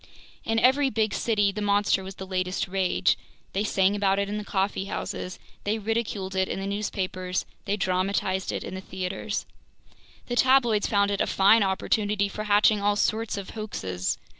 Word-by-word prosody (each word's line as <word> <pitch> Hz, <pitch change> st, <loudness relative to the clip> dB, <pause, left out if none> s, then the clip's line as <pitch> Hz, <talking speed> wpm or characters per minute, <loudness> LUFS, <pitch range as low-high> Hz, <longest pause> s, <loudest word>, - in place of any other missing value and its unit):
In 225 Hz, 0 st, 0 dB
every 265 Hz, +4 st, +4 dB
big 220 Hz, -4 st, 0 dB
city 205 Hz, -3 st, +2 dB
the 210 Hz, +2 st, -5 dB
monster 205 Hz, -1 st, +2 dB
was 190 Hz, 0 st, -8 dB
the 190 Hz, -, -7 dB
latest 185 Hz, 0 st, -1 dB
rage; 190 Hz, -1 st, +1 dB, 0.3 s
they 195 Hz, -, 0 dB
sang 195 Hz, -1 st, +2 dB
about 195 Hz, -1 st, +2 dB
it 200 Hz, 0 st, 0 dB
in 210 Hz, +1 st, -3 dB
the -, -, -5 dB
coffee 195 Hz, -1 st, -1 dB
houses, 185 Hz, -2 st, -4 dB, 0.3 s
they 210 Hz, +2 st, 0 dB
ridiculed 210 Hz, -3 st, -2 dB
it 190 Hz, 0 st, +1 dB
in -, -, -3 dB
the 195 Hz, -, -4 dB
newspapers, 185 Hz, -2 st, -2 dB, 0.2 s
they 205 Hz, 0 st, 0 dB
dramatized 190 Hz, 0 st, 0 dB
it -, -, -3 dB
in -, -, -6 dB
the 190 Hz, -, -5 dB
theaters. 190 Hz, +2 st, -4 dB, 0.8 s
The 245 Hz, -, -3 dB
tabloids 245 Hz, -5 st, +4 dB
found 200 Hz, -1 st, +2 dB
it 200 Hz, -, 0 dB
a -, -, +1 dB
fine 200 Hz, +4 st, +5 dB
opportunity 200 Hz, +1 st, +1 dB
for 215 Hz, +2 st, -5 dB
hatching 210 Hz, 0 st, +4 dB
all 205 Hz, 0 st, +2 dB
sorts 220 Hz, +1 st, 0 dB
of 200 Hz, -, -6 dB
hoaxes. 95 Hz, -, -3 dB
200 Hz, 180 wpm, -26 LUFS, 190-215 Hz, 0.8 s, fine